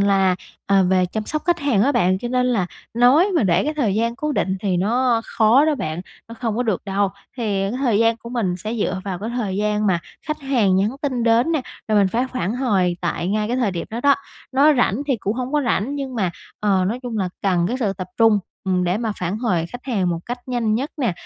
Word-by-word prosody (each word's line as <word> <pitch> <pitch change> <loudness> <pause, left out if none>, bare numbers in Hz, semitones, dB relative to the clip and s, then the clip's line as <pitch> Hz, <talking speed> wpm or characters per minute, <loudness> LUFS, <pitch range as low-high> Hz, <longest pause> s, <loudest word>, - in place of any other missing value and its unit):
là, 195 -2 +3 0.3
ờ, 195 -1 +4
về 185 0 +3
chăm 215 +4 -4
sóc 305 - -2
khách 345 -1 +2
hàng 265 -9 +2
á 280 +5 +3
bạn, 185 -6 +2
cho 240 - -4
nên 250 0 +1
là 220 -8 +1 0.3
nói 255 - +5
mà 305 - +3
để 180 +2 +2
cái 305 +1 -1
thời 230 -10 +1
gian 230 +2 0
cố 300 +3 -2
định 190 -7 0
thì 190 -3 0
nó 235 +5 +2
khó 230 +6 +4
đó 310 -1 +2
bạn, 155 - -3 0.3
nó 230 - -8
không 225 -2 -3
có 245 - +1
được 215 -6 -1
đâu. 200 0 +1 0.3
Thì 240 - -4 0.2
cái 195 - -1
thời 240 -7 +2
gian 230 0 +3
của 235 0 -11
mình 200 -8 -1
sẽ 215 +5 -4
dựa 195 -4 -1
vào 190 -3 -3
cái 215 +3 -4
thời 200 -5 -2
gian 210 0 0
mà 185 -3 +3 0.3
khách 305 0 -3
hàng 235 -9 +2
nhắn 200 +3 +2
tin 255 -4 -1
đến 235 +7 +3
nè, 310 - +1 0.3
rồi 215 -1 +3
mình 195 -2 +4
phải 240 +6 0
phản 215 -4 -1
hồi 195 -9 +1
tại 170 0 -2
ngay 210 +1 0
cái 245 - 0
thời 240 -5 +1
điểm 170 -2 -4
đó 230 - -4
đó. 280 +1 +5 0.4
Nó 290 +3 +5
rảnh 245 +1 +1
thì 270 - +1
cũng 205 0 -2
hông 255 +2 -4
có 295 -1 +2
rảnh 235 +4 0
nhưng 270 -3 -4
mà, 190 -6 0 0.3
ờ, 195 -3 +2
nói 235 +4 -3
chung 235 -3 -4
là 185 - 0
cần 180 -3 +2
cái 250 - -1
sự 205 -4 +1
tập 185 -2 -6
trung, 225 -2 +5 0.3
ừm, 180 -1 +1
để 180 +3 0
mà 225 -2 -1
phản 180 +4 -2
hồi 185 -9 0
khách 245 +9 -10
hàng 200 -9 0
một 170 -1 -1
cách 245 +1 -4
nhanh 235 -4 0
nhất 270 +6 -2
nè. 245 - 0
220 Hz, 255 wpm, -21 LUFS, 190-250 Hz, 0.4 s, nói